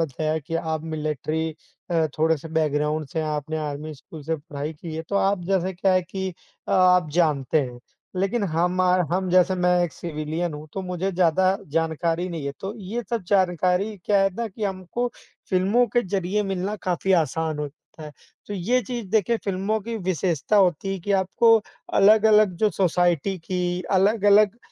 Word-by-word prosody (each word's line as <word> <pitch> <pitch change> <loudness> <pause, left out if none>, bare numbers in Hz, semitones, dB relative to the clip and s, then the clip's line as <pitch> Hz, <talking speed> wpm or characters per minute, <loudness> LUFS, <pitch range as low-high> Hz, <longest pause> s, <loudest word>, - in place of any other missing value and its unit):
बताया 155 +1 -1
कि 160 +2 -7
आप 160 -1 -2
मिलिट्री 155 0 -2 0.4
अ, 165 -2 +2
थोड़े-से 160 0 +1
बैकग्राउंड 150 0 0
से 165 - -4
हैं। 155 - -1
आपने 150 +1 -3
आर्मी 150 +1 -4
स्कूल 150 +2 -12
से 160 +2 -1
पढ़ाई 145 0 -6
की 160 +1 -8
है, 160 - -4
तो 200 - 0
आप 195 -2 +1
जैसे 190 0 0
क्या 185 +1 +1
है 185 0 +3
कि 190 +2 -4 0.4
अ, - - -2
आप 180 -3 +4
जानते 155 -4 +2
हैं, 125 -2 -5 0.4
लेकिन 200 +3 0
हमार 180 +1 +2
हम 185 0 0
जैसे 185 +1 +4
मैं 180 0 +2
एक 165 - -5
सिविलियन 160 0 -4
हूँ, 150 +1 -8
तो 195 - -4
मुझे 180 +1 -2
ज़्यादा 185 +2 +3
जानकारी 165 +3 -1
नहीं 165 -5 -5
है। 140 - -2
तो 195 +3 -5
ये 215 +5 -4
सब 230 -4 -1
जानकारी 185 +2 +1
क्या 200 -2 +3
है 195 -1 +1
ना 230 0 -3
कि 210 +2 -5
हमको 195 +6 -2 0.4
फ़िल्मों 200 +6 +3
के 240 - +5
ज़रिए 195 +2 0
मिलना 195 +1 -2
काफ़ी 185 +1 0
आसान 155 +1 -3
होता 150 0 -5 0.3
है, 150 -1 -8 0.3
तो 205 - -5
ये 235 +8 +1
चीज़ 235 -1 -5
देखिए 225 +1 +2
फ़िल्मों 200 +3 -1
की 230 +2 -5
विशेषता 185 0 0
होती 195 0 +2
है 195 - -3
कि 200 +4 -2
आपको 200 +4 +4 0.4
अलग-अलग 215 -1 +5
जो 215 +2 +3
सोसाइटी 175 0 +1
की 180 +1 -2
अलग-अलग 205 +2 +4
180 Hz, 175 wpm, -24 LUFS, 160-195 Hz, 0.4 s, के